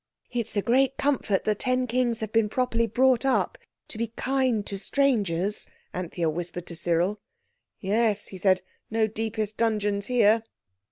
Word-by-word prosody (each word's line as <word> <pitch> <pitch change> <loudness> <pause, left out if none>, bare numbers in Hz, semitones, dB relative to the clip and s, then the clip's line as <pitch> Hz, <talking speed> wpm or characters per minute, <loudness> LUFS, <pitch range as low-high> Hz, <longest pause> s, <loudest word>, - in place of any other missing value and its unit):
"It's 235 -3 -3
a 200 - +1
great 265 +2 +2
comfort 255 -9 +1
the 215 - +2
ten 255 +4 0
Kings 240 -1 0
have 220 -1 -3
been 225 -2 +2
properly 230 -1 +1
brought 255 +2 +3
up—to 260 -3 -2
be 230 - 0
kind 250 -2 0
to 195 - -5
strangers," 205 -8 +1 0.3
Anthea 175 -2 -2
whispered 175 +2 -4
to 170 - -7
Cyril. 175 +5 0 0.6
"Yes," 210 +1 +1
he 190 - -8
said, 185 0 +3 0.3
"no 225 0 +2
deepest 220 0 -3
dungeons 210 -3 0
here." 225 -3 +4
220 Hz, 150 wpm, -26 LUFS, 200-245 Hz, 0.6 s, here